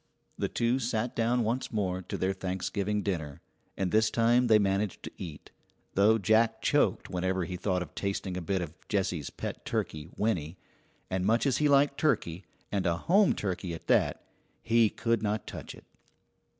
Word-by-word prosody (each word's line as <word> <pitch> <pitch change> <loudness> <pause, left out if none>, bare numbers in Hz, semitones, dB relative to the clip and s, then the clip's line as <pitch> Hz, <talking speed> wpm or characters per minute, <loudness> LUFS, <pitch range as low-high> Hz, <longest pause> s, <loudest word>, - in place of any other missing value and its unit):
The - - -1
two 120 +2 +1
sat 115 -1 -1
down 120 +1 +2
once 120 +4 -1
more 95 -4 -1
to 90 - -5
their 95 +1 0
Thanksgiving 95 +2 -2
dinner, 80 -8 -3 0.4
and 95 -2 -1
this 110 0 +4
time 120 +2 +3
they 110 -2 +7
managed 100 -1 0
to - - -6
eat, 80 -5 -9 0.4
though 105 +3 +5
Jack 110 +2 +3
choked - - +1
whenever 95 +1 0
he 90 - -5
thought 90 -1 -1
of - - -13
tasting 100 -2 -3
a 90 - -3
bit 90 +2 -1
of 80 -2 -7
Jessie's 90 -7 -1
pet - - -6
turkey, 75 +1 -3
Winnie; 90 -6 -1 0.5
and 95 0 0
much 115 +6 +2
as 135 - +2
he 150 -1 +2
liked 140 0 +4
turkey, 100 - 0 0.3
and 100 -3 0
a 85 -1 +1
home 195 - +4
turkey 90 -3 -3
at - - -11
that, - - +2 0.4
he 115 -1 +4
could 115 0 0
not 105 0 -1
touch - - -8
it. - - -16
100 Hz, 175 wpm, -29 LUFS, 90-115 Hz, 0.5 s, they